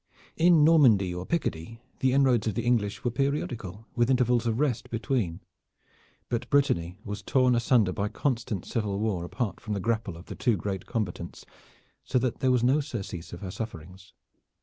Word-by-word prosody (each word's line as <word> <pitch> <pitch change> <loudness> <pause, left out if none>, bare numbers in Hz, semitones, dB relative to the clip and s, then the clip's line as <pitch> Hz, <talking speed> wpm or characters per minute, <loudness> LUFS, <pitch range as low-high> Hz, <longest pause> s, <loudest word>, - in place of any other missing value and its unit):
In 165 -2 +5
Normandy 120 - +5
or 90 +1 -6
Picardy 115 - -2 0.2
the 130 - +2
inroads 130 -5 +3
of 105 - -1
the 115 - -1
English 110 -5 0
were 120 - 0
periodical 120 -7 -2
with 120 0 +2
intervals 125 -2 +2
of 115 +1 0
rest 140 -6 0
between; 115 -7 -2 0.9
but 120 -1 -3
Brittany 90 -12 +1
was 105 0 -5
torn 130 -2 +3
asunder 120 -4 +3
by 100 +3 -1
constant 115 - -2
civil 105 -4 -2
war 105 -5 -1
apart 105 +4 -3
from 105 -1 -4
the - - -2
grapple 110 -4 -2
of 85 - -12
the - - -7
two 115 -4 +1
great 95 +1 -4
combatants, 90 -6 -4 0.6
so - - 0
that 125 -1 0
there 130 - +2
was 125 -2 +3
no 130 +5 +4
surcease 110 - -5
of 85 - -8
her 95 -2 -5
sufferings. 95 -3 -8
115 Hz, 175 wpm, -27 LUFS, 95-130 Hz, 0.9 s, In